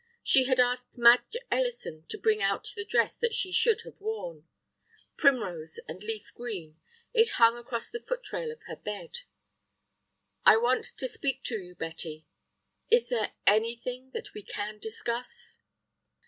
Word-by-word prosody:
She 260 Hz, -1 st, +6 dB
had 260 Hz, -1 st, +2 dB
asked 250 Hz, 0 st, +1 dB
Madge 240 Hz, -, +6 dB
Ellison 480 Hz, -, -1 dB
to -, -, -5 dB
bring 430 Hz, 0 st, +2 dB
out -, -, 0 dB
the 425 Hz, -, -3 dB
dress -, -, +1 dB
that 470 Hz, -2 st, +1 dB
she 370 Hz, -, -1 dB
should 455 Hz, +3 st, +3 dB
have -, -, -13 dB
worn. 175 Hz, -, -5 dB, 0.7 s
Primrose 185 Hz, -, +1 dB
and 185 Hz, -, -7 dB
leaf 215 Hz, -1 st, -5 dB
green, 180 Hz, -10 st, -7 dB, 0.3 s
it 455 Hz, -3 st, +4 dB
hung 230 Hz, 0 st, +7 dB
across 240 Hz, -1 st, -4 dB
the 470 Hz, -, -4 dB
foot -, -, -5 dB
rail 475 Hz, -2 st, -2 dB
of 465 Hz, -, -12 dB
her -, -, -7 dB
bed. 485 Hz, -1 st, -6 dB, 1.2 s
"I -, -, +8 dB
want 245 Hz, +3 st, +2 dB
to 260 Hz, -, 0 dB
speak 270 Hz, 0 st, -2 dB
to 225 Hz, -3 st, -2 dB
you, 180 Hz, -1 st, -12 dB
Betty." 160 Hz, -1 st, -5 dB, 0.6 s
"Is 470 Hz, +1 st, +4 dB
there -, -, 0 dB
anything 235 Hz, +4 st, +1 dB
that -, -, -6 dB
we 210 Hz, -, -7 dB
can 210 Hz, +1 st, -5 dB
discuss?" 240 Hz, -, -4 dB
245 Hz, 155 wpm, -29 LUFS, -, 1.2 s, I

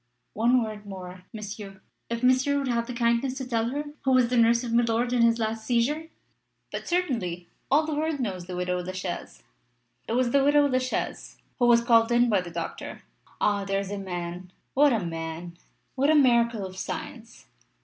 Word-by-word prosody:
"One 240 Hz, +3 st, +3 dB
word 210 Hz, -1 st, -7 dB
more, 185 Hz, -1 st, -9 dB
Monsieur. 205 Hz, -2 st, -8 dB, 0.3 s
If 235 Hz, +1 st, -3 dB
Monsieur 260 Hz, +3 st, +3 dB
would 275 Hz, -1 st, -1 dB
have 235 Hz, -1 st, 0 dB
the 250 Hz, -, -5 dB
kindness 235 Hz, +2 st, +1 dB
to 260 Hz, -2 st, -5 dB
tell 230 Hz, -2 st, 0 dB
her 285 Hz, +3 st, -2 dB, 0.2 s
who 265 Hz, -1 st, +2 dB
was 250 Hz, -2 st, +4 dB
the 250 Hz, -, 0 dB
nurse 235 Hz, +1 st, +4 dB
of 235 Hz, -2 st, -3 dB
milord 235 Hz, +1 st, +2 dB
in 245 Hz, -, +3 dB
his 230 Hz, 0 st, +4 dB
last 220 Hz, -1 st, -2 dB
seizure?" 260 Hz, +8 st, 0 dB, 0.6 s
"But -, -, -5 dB
certainly. 225 Hz, -, -1 dB, 0.2 s
All 300 Hz, +3 st, +4 dB
the 310 Hz, -, -3 dB
world 310 Hz, 0 st, -1 dB
knows 185 Hz, -7 st, -3 dB
the 180 Hz, -, -5 dB
widow 180 Hz, 0 st, -1 dB
La 185 Hz, +1 st, -6 dB
Chaise. 185 Hz, -1 st, -6 dB, 0.6 s
It -, -, -2 dB
was 245 Hz, 0 st, +2 dB
the 275 Hz, +1 st, +4 dB
widow 290 Hz, +1 st, +5 dB
La 255 Hz, -2 st, +2 dB
Chaise 255 Hz, 0 st, -4 dB, 0.2 s
who 245 Hz, -, +4 dB
was 235 Hz, -1 st, +5 dB
called 230 Hz, -1 st, +4 dB
in 240 Hz, 0 st, +4 dB
by 205 Hz, -4 st, +3 dB
the 180 Hz, -, -8 dB
doctor. 170 Hz, -1 st, -6 dB, 0.4 s
Ah! 205 Hz, -1 st, +1 dB
there 195 Hz, 0 st, -1 dB
is 200 Hz, 0 st, -5 dB
a 205 Hz, -, -3 dB
man 180 Hz, -1 st, -6 dB, 0.2 s
what 290 Hz, +1 st, +5 dB
a 220 Hz, -7 st, 0 dB
man! 165 Hz, +1 st, -5 dB, 0.4 s
What 275 Hz, +2 st, +1 dB
a 315 Hz, -, +5 dB
miracle 235 Hz, -6 st, +3 dB
of 185 Hz, 0 st, -9 dB
science! -, -, -7 dB
230 Hz, 200 wpm, -26 LUFS, 190-255 Hz, 0.6 s, widow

